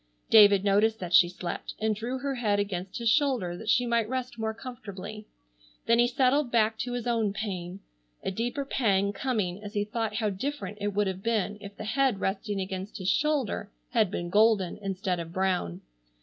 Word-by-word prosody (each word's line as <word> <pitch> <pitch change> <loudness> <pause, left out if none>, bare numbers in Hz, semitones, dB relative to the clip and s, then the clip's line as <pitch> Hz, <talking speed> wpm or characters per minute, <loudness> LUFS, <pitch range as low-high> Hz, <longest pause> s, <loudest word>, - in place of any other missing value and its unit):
David 205 -3 +8
noticed 210 +2 +3
that 180 -1 -5
she 175 0 +7
slept, 175 -1 -5
and 215 0 +1
drew 235 +5 -3
her 275 +1 -2
head 215 -5 +1
against 195 0 -3
his 235 -1 -2
shoulder 245 - +2
that 215 +4 -6
she 245 +2 +4
might 235 -2 +1
rest 255 -2 -4
more 220 0 -1
comfortably. 215 -4 -8 0.6
Then 230 0 +4
he 240 - +5
settled 260 +1 +2
back 225 -1 +2
to 245 -1 -3
his 245 -2 -3
own 225 -4 +1
pain, 190 -3 -5 0.4
a - - -1
deeper 240 +7 -2
pang 200 -7 +1
coming 205 -5 -2
as 205 +1 -8
he 205 - +2
thought 215 0 -3
how 215 -2 0
different 210 -2 -4
it 205 -1 -2
would 205 0 +2
have 190 -1 -3
been 210 -2 -1
if 200 0 -10
the - - -6
head 245 0 +1
resting 195 +1 -2
against 190 +1 -5
his 185 -1 0
shoulder 290 -8 0 0.2
had 220 -6 +3
been 175 -2 -4
golden 210 -3 +3
instead 190 -2 -2
of 165 -1 -6
brown. 180 - -1
210 Hz, 190 wpm, -28 LUFS, 195-235 Hz, 0.6 s, David